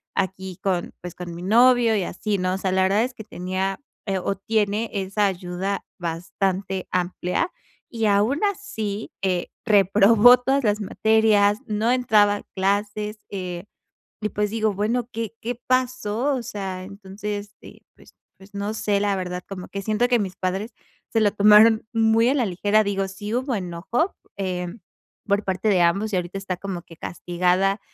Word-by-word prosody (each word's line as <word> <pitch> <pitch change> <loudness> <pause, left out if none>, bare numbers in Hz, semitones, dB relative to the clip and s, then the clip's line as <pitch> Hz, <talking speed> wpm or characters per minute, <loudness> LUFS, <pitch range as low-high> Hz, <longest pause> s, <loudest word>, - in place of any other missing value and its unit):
aquí 190 -1 -3
con, 185 -3 -1
pues, 180 -1 -7
con 175 -1 -7
mi 170 - -8
novio 235 +2 +5
y 195 - 0
así, 205 +3 -2
¿no? 185 0 0
O - - -1
sea, 190 -1 -1
la 190 0 +3
verdad 200 +4 +3
es 250 +1 -3
que 220 -3 -10
tenía, 190 0 -3 0.3
eh, 195 -3 -1
o, 195 +2 -2
tiene 215 +2 0
esa 195 +1 0
ayuda 185 +1 -3
bastante 185 +2 -2
amplia 180 - -1 0.4
y 225 -2 -1
aún 210 +7 +3
así, 225 - -3
eh, 185 -2 0 0.2
reprobó 210 +4 +6
todas 270 +2 +1
las 210 -1 +1
materias, 210 0 +3
no 215 +2 +1
entraba 215 -5 +4
a - - -11
clases. 205 +2 -1
Eh, 180 -2 -5 0.6
y 210 - -1
pues, 210 0 -1
digo 220 -1 0
bueno, 230 +5 -1
¿qué 225 -2 -4
qué 240 +2 -3
pasó? 255 0 0
O 250 - -4
sea, 190 -4 -5
entonces, 205 +1 -7 0.4
pues - - -19 0.2
pues 195 +2 -17
no 200 +1 -3
sé, 205 -2 0
la 200 -1 +1
verdad, 180 -1 -4
como 185 -2 -7
que 200 - -5
siento 215 +4 +1
que 245 -1 +3
mis 190 -3 -3
padres 190 +4 -3 0.4
se 225 - +3
lo 205 -2 +4
tomaron 215 +2 +6
muy 225 0 +3
a - - +3
la 265 -4 +1
ligera. 205 +3 +2
Digo, 195 -1 -1
sí 205 +3 -6
hubo 255 +1 0
enojo, 190 - -2 0.2
eh, 180 -2 -2 0.6
por 200 0 +1
parte 190 +3 0
de 190 -3 +4
ambos 195 +6 +2
y - - +2
ahorita 180 +2 -3
está 195 -2 -4
como 185 -2 -5
que 165 - -15
castigada. 180 +3 0
205 Hz, 170 wpm, -23 LUFS, 190-220 Hz, 0.6 s, reprobó